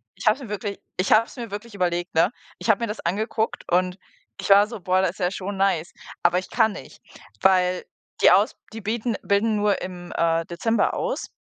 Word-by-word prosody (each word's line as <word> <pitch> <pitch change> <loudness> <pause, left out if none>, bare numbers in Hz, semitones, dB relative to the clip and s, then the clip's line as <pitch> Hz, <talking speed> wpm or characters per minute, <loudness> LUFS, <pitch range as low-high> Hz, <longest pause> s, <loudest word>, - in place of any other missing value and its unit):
ich - - -9
habe 215 - +6
es - - -14
mir 235 - -9
wirklich 205 -1 -4 0.2
ich 185 - 0
habe 220 +1 +6
es - - -15
mir 235 -5 -7
wirklich 210 +2 -7
überlegt, 175 -2 -1
ne? 165 +5 +4 0.3
Ich - - -4
hab 215 - +5
mir 235 - -1
das 210 0 -5
angeguckt 220 +5 -1
und 180 +1 +2 0.4
ich 195 - -4
war 200 +1 +7
so: 230 -1 -7
„Boah, 185 +1 +2
da 190 - +2
ist 180 +3 -6
ja 180 -1 +1
schon 195 0 -5
nice“, 190 -4 +1 0.3
aber 175 +1 +4
ich 185 - -9
kann 220 -2 +3
nicht, - - -11 0.4
weil 185 -1 +3 0.4
die - - +7
aus - - +4 0.2
die 225 - -7
bieten 225 +2 -1
bilden 210 +2 +2
nur 205 -1 +1
im, 180 -1 -7
äh, 165 0 +1
Dezember 225 +7 0
aus - - -2
195 Hz, 220 wpm, -24 LUFS, 180-215 Hz, 0.4 s, war